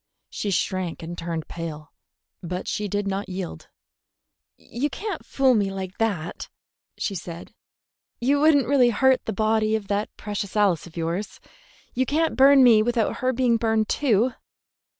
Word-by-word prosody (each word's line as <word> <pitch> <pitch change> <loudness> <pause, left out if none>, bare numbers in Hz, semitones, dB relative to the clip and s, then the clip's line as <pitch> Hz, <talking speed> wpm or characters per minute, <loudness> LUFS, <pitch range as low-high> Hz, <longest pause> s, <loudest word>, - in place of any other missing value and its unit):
She 205 - -3
shrank 185 -3 -2
and 170 +2 -6
turned 165 -2 -4
pale; 160 -3 -7 0.5
but 180 +1 -5
she 210 - -2
did 205 +1 -2
not 195 +1 -3
yield. 180 - -6 0.9
"You 265 +6 -3
can't 400 +3 -5
fool 265 -2 +2
me 205 -4 +1
like 190 -1 -6
that," 190 -8 -2 0.5
she 200 - -2
said. 175 +1 -8 0.7
"You 275 +4 +2
would 310 +1 +5
n't 275 -3 +3
really 260 -3 +4
hurt 260 +3 +3
the - - -2
body 215 +1 +1
of 205 -3 -4
that 205 +1 -1
precious 205 -1 -5
Alice 195 -6 +2
of 170 - -14
yours. 170 +5 -3 0.5
You 260 +1 0
can't 320 +3 +1
burn 270 0 +7
me 230 -4 +7
without 235 0 0
her 255 0 0
being 245 -2 +2
burned 220 -1 0
too." 245 -3 +2
215 Hz, 160 wpm, -24 LUFS, 185-255 Hz, 0.9 s, burn